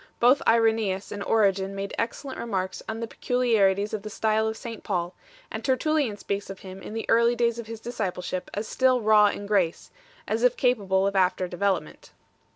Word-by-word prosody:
Both 250 +4 +5
Irenseus 220 -4 +2
2 - - -6
and 205 -1 -5
Origen 195 -3 +2
3 195 - -8
made 195 0 -4
excellent 260 +4 -4
remarks 190 -5 -3
on 220 +1 -4
the 230 - -3
peculiarities 215 -6 +1
of 215 - -2
the 215 - -7
style 220 +1 +1
of 220 0 -3
St 230 -2 -8
Paul, 175 -2 -2 0.4
and - - -5
Tertullian 275 -4 +1
speaks 200 -1 -4
of 195 - -8
him 190 0 -9
in 210 - -8
the 225 - -3
early 235 +1 +4
days 235 0 +1
of 230 - -7
his 225 -1 -7
discipleship 185 -6 -4
as 210 +2 -3
still 255 -1 +3
raw 215 -1 +6
in 205 0 -3
grace 195 -5 0 0.4
4, - - -1
as 225 - 0
if 250 0 +3
capable 200 -7 +2
of 200 0 -1
after 185 -1 +2
development. 195 +2 -2
215 Hz, 200 wpm, -26 LUFS, 195-230 Hz, 0.4 s, raw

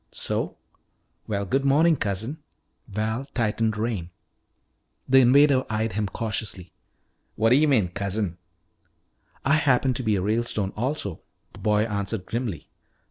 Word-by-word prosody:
"So? - - -3 0.7
Well, 100 -2 -1
good 135 +8 0
morning, 155 +4 +4
cousin." 110 +6 -3 0.5
Val 110 +5 -2
tightened 110 -2 0
rein. 105 -6 -2 1.0
The 135 +1 +6
invader 130 +1 +5
eyed 110 -1 -1
him 105 +1 -1
cautiously. 100 -4 -4 0.6
"What 115 +1 +2
d'yuh 145 +5 +5
mean 110 -11 +3
cousin?" 100 -1 -3 1.1
"I 140 +3 +4
happen 135 -3 +3
to 125 - -3
be 110 -4 +1
a 95 - 0
Ralestone 105 -2 -1
also," 115 - -3 0.3
the - - -12
boy 105 0 +2
answered 100 -2 -3
grimly. 115 -7 -4
110 Hz, 130 wpm, -25 LUFS, 100-130 Hz, 1.1 s, The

